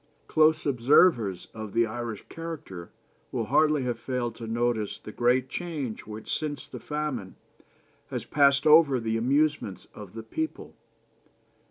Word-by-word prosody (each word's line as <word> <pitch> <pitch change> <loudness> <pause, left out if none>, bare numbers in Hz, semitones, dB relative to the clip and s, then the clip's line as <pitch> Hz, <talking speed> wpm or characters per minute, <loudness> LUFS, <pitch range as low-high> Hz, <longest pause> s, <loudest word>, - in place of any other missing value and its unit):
Close 155 0 +3
observers 125 - +3
of 110 -2 -7
the 115 0 +3
Irish 115 -1 -5
character 155 - -7 0.4
will - - -2
hardly 150 -3 +3
have 120 -2 -2
failed 125 -3 -2
to 115 0 -8
notice 115 -2 -1
the 105 - -10
great 125 +3 +2
change 150 -13 -5
which 110 0 -4
since 150 -2 -4
the - - -8
famine 150 -10 -4 0.7
has - - -4
passed 140 -1 +3
over 150 -4 +6
the 115 -1 -1
amusements 135 - 0
of 105 -1 -11
the 115 - -6
people. 320 - -5
125 Hz, 140 wpm, -27 LUFS, 110-150 Hz, 0.7 s, over